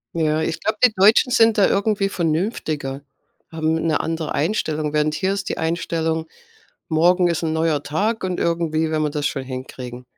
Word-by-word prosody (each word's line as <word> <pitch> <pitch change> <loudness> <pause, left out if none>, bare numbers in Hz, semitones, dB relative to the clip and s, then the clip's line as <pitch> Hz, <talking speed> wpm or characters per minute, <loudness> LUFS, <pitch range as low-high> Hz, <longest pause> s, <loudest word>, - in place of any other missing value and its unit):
Ja, 155 -1 +1
ich 165 +1 -2
glaube, 215 0 -1
die 240 - +3
Deutschen 215 +6 +5
sind 225 -2 +4
da 200 - +5
irgendwie 200 0 +1
vernünftiger 160 - -2 0.5
haben 160 -1 0
'ne 160 -2 +1
andere 160 -1 -3
Einstellung. 155 -3 -1
Während 150 0 +1
hier 190 +1 0
ist 195 0 -4
die - - -3
Einstellung: 160 -1 -1 0.6
„Morgen 175 +2 +3
ist 170 -1 -1
'n 160 - -1
neuer 160 -2 0
Tag. 210 +9 -1
Und 185 -1 -2
irgendwie 160 -2 0
werden 155 -1 0
wir 150 - 0
das 145 -1 -2
schon 135 -2 -5
hinkriegen." 130 -1 -8
160 Hz, 175 wpm, -21 LUFS, 155-185 Hz, 0.6 s, Deutschen